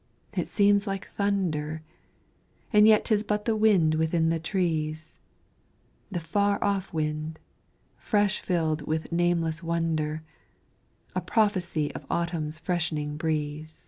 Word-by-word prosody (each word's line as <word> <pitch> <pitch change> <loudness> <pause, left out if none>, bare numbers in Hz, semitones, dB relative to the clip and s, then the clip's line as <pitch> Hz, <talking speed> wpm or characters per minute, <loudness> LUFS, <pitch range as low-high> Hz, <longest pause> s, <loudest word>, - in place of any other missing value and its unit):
it - - -1
seems 205 0 +3
like 195 -1 -4
thunder, 160 -7 -1 0.9
And 210 0 +7
yet 215 -1 +5
'tis 215 -3 +3
but 210 -1 -2
the 225 - +2
wind, 200 -8 +4
within 160 +1 +2
the 165 0 +1
trees, 160 -3 -2 0.9
The 185 -4 -2
far 200 +5 +1
off 195 -1 0
wind, 155 0 -2 0.6
fresh 205 -2 +1
filled 160 -4 0
with 160 +1 -2
nameless 170 -1 +1
wonder, 160 -2 -1 0.9
A - - -1
prophesy 185 -8 0
of - - -8
Autumn's 165 -3 -2
freshening 160 -3 -2
breeze. 155 0 -3
165 Hz, 120 wpm, -27 LUFS, 155-200 Hz, 0.9 s, And